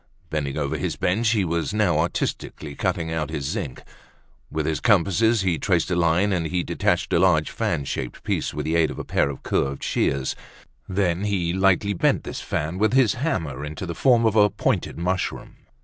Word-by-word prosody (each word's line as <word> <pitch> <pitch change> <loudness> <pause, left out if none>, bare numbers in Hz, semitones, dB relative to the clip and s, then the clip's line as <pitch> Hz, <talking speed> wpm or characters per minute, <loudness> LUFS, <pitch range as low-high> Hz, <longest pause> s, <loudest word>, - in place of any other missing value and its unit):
Bending 70 -3 -2
over 70 -2 -1
his - - -2
bench, 110 +6 +1
he 105 -4 +2
was 85 +4 -1
now 95 -8 +2
artistically 80 -2 -3
cutting 80 +3 -2
out 80 -3 -2
his 70 - -4
zinc. 65 - -4 0.7
With - - -2
his - - -1
compasses 105 +5 +3
he 90 -4 0
traced 90 -2 +1
a - - +2
line, 85 +4 +2
and 85 -3 0
he 90 +2 -1
detached - - 0
a - - +4
large 80 -5 +3
fan 70 - -1
shaped - - -5
piece - - -1
with - - -4
the 80 - 0
aid 80 -2 +3
of - - -7
a - - -4
pair - - +1
of 70 - -7
curved 70 0 -1
shears; 70 -1 0 0.5
then 95 -1 0
he 90 -5 0
lightly 95 +2 +2
bent 90 - +1
this - - -6
fan 80 +5 -3
with 110 +3 +2
his 130 -6 +4
hammer 80 - -2
into 75 +5 -5
the 85 - -4
form 120 +2 +3
of 110 -1 +2
a 105 -1 +6
pointed 100 - -1
mushroom. 90 +2 -3
90 Hz, 195 wpm, -24 LUFS, 80-100 Hz, 0.7 s, a